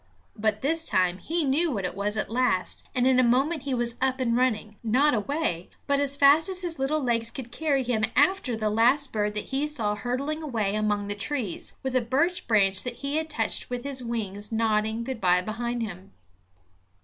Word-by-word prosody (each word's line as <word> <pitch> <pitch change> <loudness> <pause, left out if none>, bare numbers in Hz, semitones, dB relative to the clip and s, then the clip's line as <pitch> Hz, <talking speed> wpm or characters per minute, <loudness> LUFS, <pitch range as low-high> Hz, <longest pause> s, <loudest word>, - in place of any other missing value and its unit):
But 215 +1 0
this 325 +3 +1
time 185 0 +1
he 330 - -1
knew 295 +5 +2
what 200 -9 -2
it 180 - -3
was 205 +2 -2
at - - 0
last, 235 -7 0
and 250 -1 +2
in 260 -1 +4
a - - +5
moment 270 +6 +2
he 275 -2 -2
was 235 -1 -1
up 260 0 +1
and 235 -2 +1
running, 220 -4 0
not 260 +7 +3
away, 220 - -1 0.2
but 280 -1 +2
fast 285 +5 +5
as 370 -1 -4
his 335 -4 -5
little 290 +3 0
legs 230 -2 +1
could 245 -1 -8
carry 285 -3 0
him 230 -3 +1
after 290 -4 +2
the 215 -1 0
last 255 +6 +3
bird 210 -1 -1
that 210 - -5
he 280 +3 +1
saw 225 -9 -1
hurtling 255 +9 -3
away 225 -10 -1
among 210 -1 0
the 205 - -2
trees, 210 - -3
with 265 -1 -2
a 255 - +4
birch 330 +10 0
branch 195 -4 +3
that 245 -1 -5
he 285 +2 0
had 320 0 -2
touched 225 -8 -2
with 245 -1 -4
his 270 -2 -4
wings 210 -3 -4
nodding 220 0 0
good 255 -1 -5
by 180 -1 +4
behind 235 +4 -3
him. 190 -2 -8
245 Hz, 205 wpm, -26 LUFS, 215-280 Hz, 0.2 s, a